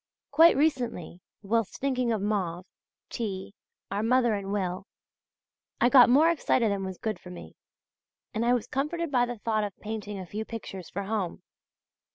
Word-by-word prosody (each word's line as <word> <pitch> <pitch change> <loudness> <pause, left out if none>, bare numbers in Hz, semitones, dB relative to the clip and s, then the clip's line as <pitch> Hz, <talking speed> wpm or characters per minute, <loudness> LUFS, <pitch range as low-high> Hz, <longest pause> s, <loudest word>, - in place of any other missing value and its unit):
Quite 325 +3 +6
recently, 245 - -1 0.2
whilst 225 +1 0
thinking 255 -3 0
of 215 -3 -1
Mauve, 185 -4 -1 0.5
T., 195 -5 -4 0.4
our 200 +1 -1
mother 240 0 +3
and 200 -1 -3
Will, 190 -1 -2 0.9
I 240 - +4
got 250 -3 +8
more 305 +7 +6
excited 250 -8 +1
than 200 -1 -2
was 190 -1 -5
good 220 -1 -3
for 180 - -12
me, 180 - -10 0.8
and 225 0 -1
I 240 +1 +3
was 240 - -2
comforted 300 +4 -2
by 245 -2 +3
the 245 -1 -5
thought 215 0 0
of 205 -2 -5
painting 210 -1 -5
a 190 - -6
few 210 +5 -5
pictures 195 -5 -8
for 200 - -4
home. 195 -3 -3
220 Hz, 170 wpm, -28 LUFS, 195-245 Hz, 0.9 s, got